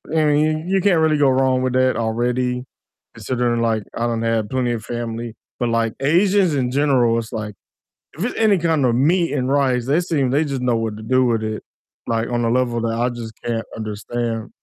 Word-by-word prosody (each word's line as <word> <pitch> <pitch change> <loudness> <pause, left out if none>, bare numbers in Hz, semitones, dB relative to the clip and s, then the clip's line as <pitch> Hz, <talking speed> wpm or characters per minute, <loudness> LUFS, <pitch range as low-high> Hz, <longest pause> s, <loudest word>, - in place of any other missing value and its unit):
I 160 - +3
mean, 155 +2 +1
you 190 +1 +1
can't 180 -3 +3
really 160 -1 +3
go 145 -2 +4
wrong 130 0 +2
with 130 -1 -1
that 130 0 +2
already 125 +2 -1 0.5
considering 120 -2 -1
like 110 -2 0
I 115 - -1
don't 115 -1 -2
have 115 -2 0
plenty 130 -2 0
of 110 -2 -5
family, 115 -1 -5 0.2
but 120 - 0
like 115 -1 0
Asians 180 +4 +3
in 130 -3 0
general, 130 -4 +2
it's 115 +1 -5
like 105 -2 -5 0.6
if 170 - -4
it's 245 - -2
any 215 -3 +4
kind 160 -4 +1
of 120 - +2
meat 165 +7 +2
and 130 -3 -1
rice, 130 -4 +1
they 145 +5 +2
seem 150 -7 0
they 145 +4 +2
just 135 -4 -3
know 125 -2 +1
what 110 -2 -2
to 110 - -9
do 130 +3 +2
with 115 -2 +1
it, 110 0 -4 0.5
like 115 0 0
on 120 -1 0
a 115 - +1
level 120 -1 +1
that 115 0 -1
I 120 +1 +1
just 115 -2 -7
can't 115 -1 -2
understand, 115 +1 -4
125 Hz, 215 wpm, -20 LUFS, 115-145 Hz, 0.6 s, go